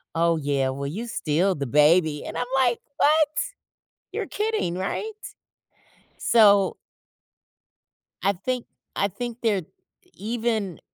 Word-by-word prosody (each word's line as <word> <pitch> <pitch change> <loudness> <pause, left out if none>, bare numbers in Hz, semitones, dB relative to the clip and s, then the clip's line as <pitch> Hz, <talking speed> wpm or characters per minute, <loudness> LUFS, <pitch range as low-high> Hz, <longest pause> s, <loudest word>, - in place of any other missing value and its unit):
"Oh 165 0 +3
yeah, 140 -3 0
well, 140 +1 -4
you 220 +11 -5
still 180 -1 +1
the 140 -2 -3
baby,” 150 +2 +3
and - - -5
I'm, - - -1
like, 245 -3 +3 0.2
"What? 310 +1 +4 0.8
You're - - -3
kidding, 425 - -1
right?" 200 - -3 1.0
So 205 -4 +5 1.5
I 200 - +2
think 245 +6 -3 0.3
I 200 - +2
think 240 +4 -6
they're 205 -6 +1 0.5
even 220 -4 -2
195 Hz, 115 wpm, -25 LUFS, 160-240 Hz, 1.5 s, So